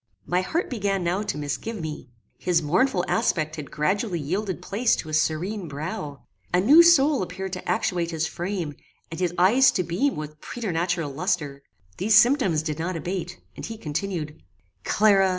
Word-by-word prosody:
My 180 Hz, +1 st, +1 dB
heart 330 Hz, -, -1 dB
began 200 Hz, -6 st, -1 dB
now 175 Hz, +4 st, 0 dB
to 210 Hz, -, -3 dB
misgive 150 Hz, +10 st, -4 dB
me. 155 Hz, -5 st, -6 dB, 0.3 s
His 175 Hz, -3 st, +1 dB
mournful 180 Hz, -, +2 dB
aspect 155 Hz, -9 st, 0 dB
had 150 Hz, -3 st, -7 dB
gradually 190 Hz, +4 st, -1 dB
yielded 185 Hz, +6 st, -2 dB
place 205 Hz, +6 st, +1 dB
to 160 Hz, -, -6 dB
a -, -, -7 dB
serene 170 Hz, +6 st, 0 dB
brow. 145 Hz, -2 st, -6 dB, 0.3 s
A 180 Hz, -, +3 dB
new 280 Hz, -, +8 dB
soul 310 Hz, -, +5 dB
appeared 185 Hz, +1 st, -5 dB
to 180 Hz, -, -5 dB
actuate 180 Hz, -6 st, 0 dB
his 160 Hz, -1 st, -1 dB
frame, 175 Hz, -4 st, -4 dB, 0.4 s
and 165 Hz, -, -6 dB
his 180 Hz, -2 st, +1 dB
eyes 235 Hz, +9 st, +6 dB
to 185 Hz, -, 0 dB
beam 240 Hz, +12 st, 0 dB
with 150 Hz, 0 st, -7 dB
preternatural 175 Hz, -, -2 dB
lustre. 150 Hz, -3 st, -2 dB, 0.4 s
These 210 Hz, +3 st, +3 dB
symptoms 220 Hz, -, +4 dB
did 155 Hz, -1 st, -3 dB
not 175 Hz, +2 st, -2 dB
abate, 175 Hz, +2 st, -4 dB, 0.2 s
and -, -, -9 dB
he 225 Hz, -, -6 dB
continued: 155 Hz, -, -4 dB, 0.4 s
"Clara! 195 Hz, -2 st, +4 dB
180 Hz, 170 wpm, -25 LUFS, 155-205 Hz, 0.4 s, new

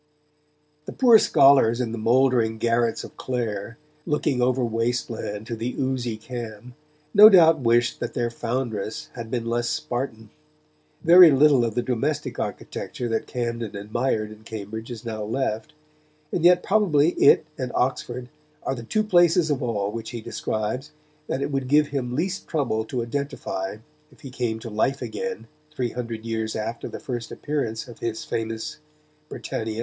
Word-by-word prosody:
The -, -, -7 dB
poor 240 Hz, -4 st, +6 dB
scholars 135 Hz, -, +5 dB
in 120 Hz, -3 st, -1 dB
the 115 Hz, -, -4 dB
mouldering 120 Hz, -1 st, +3 dB
garrets 115 Hz, 0 st, +1 dB
of -, -, -11 dB
Clare, 115 Hz, -2 st, -3 dB, 0.3 s
looking 150 Hz, -4 st, 0 dB
over 125 Hz, 0 st, +2 dB
waste 115 Hz, +2 st, -1 dB
land 105 Hz, -1 st, -5 dB
to 120 Hz, 0 st, -4 dB
the 115 Hz, +3 st, -4 dB
oozy 130 Hz, -4 st, -1 dB
Cam, 120 Hz, 0 st, -8 dB, 0.4 s
no 210 Hz, +1 st, +10 dB
doubt 165 Hz, -5 st, +6 dB
wished 120 Hz, -1 st, +2 dB
that -, -, -5 dB
their 120 Hz, -1 st, -1 dB
foundress 115 Hz, -3 st, -3 dB
had 115 Hz, -2 st, -7 dB
been 120 Hz, -1 st, -2 dB
less 120 Hz, +1 st, -1 dB
Spartan. 115 Hz, -4 st, -4 dB, 0.7 s
Very 175 Hz, +1 st, +9 dB
little 140 Hz, -2 st, +5 dB
of 115 Hz, -2 st, -2 dB
the 120 Hz, -, 0 dB
domestic 140 Hz, +5 st, -2 dB
architecture 120 Hz, -, -4 dB
that 115 Hz, -1 st, -1 dB
Camden 115 Hz, -3 st, -3 dB
admired 110 Hz, +1 st, -1 dB
in 110 Hz, 0 st, -13 dB
Cambridge 110 Hz, +1 st, -7 dB
is 120 Hz, -1 st, -8 dB
now 110 Hz, -2 st, -4 dB
left; 110 Hz, +2 st, -2 dB, 0.6 s
and 170 Hz, -, -1 dB
yet 180 Hz, 0 st, +6 dB
probably 175 Hz, -8 st, +3 dB
it 145 Hz, -, +5 dB
and 130 Hz, -3 st, -4 dB
Oxford 125 Hz, -1 st, -1 dB, 0.4 s
are -, -, -1 dB
the 125 Hz, -, -6 dB
two 215 Hz, -, 0 dB
places 175 Hz, -5 st, +4 dB
of 145 Hz, -1 st, -1 dB
all 105 Hz, -5 st, -1 dB
which 115 Hz, 0 st, -6 dB
he 120 Hz, -, -6 dB
describes 110 Hz, +6 st, -3 dB, 0.4 s
that 135 Hz, -, -2 dB
it -, -, -3 dB
would 135 Hz, -2 st, -2 dB
give 150 Hz, +2 st, +4 dB
him 125 Hz, -3 st, -3 dB
least 185 Hz, +6 st, -2 dB
trouble 120 Hz, -8 st, -1 dB
to 120 Hz, +1 st, -3 dB
identify 115 Hz, -7 st, -4 dB, 0.3 s
if 130 Hz, -, -21 dB
he 135 Hz, -, -9 dB
came 120 Hz, -3 st, -2 dB
to 115 Hz, -, -7 dB
life 130 Hz, +6 st, 0 dB
again 175 Hz, -, -5 dB, 0.2 s
three 130 Hz, -6 st, -3 dB
hundred 115 Hz, -2 st, -5 dB
years 110 Hz, -1 st, -2 dB
after 115 Hz, +2 st, -4 dB
the -, -, -7 dB
first 120 Hz, -3 st, -5 dB
appearance 130 Hz, -7 st, -3 dB
of 120 Hz, -, -12 dB
his 115 Hz, -1 st, -4 dB
famous 115 Hz, +2 st, -4 dB, 0.5 s
Britannia. 110 Hz, 0 st, -4 dB
120 Hz, 165 wpm, -24 LUFS, 110-135 Hz, 0.7 s, no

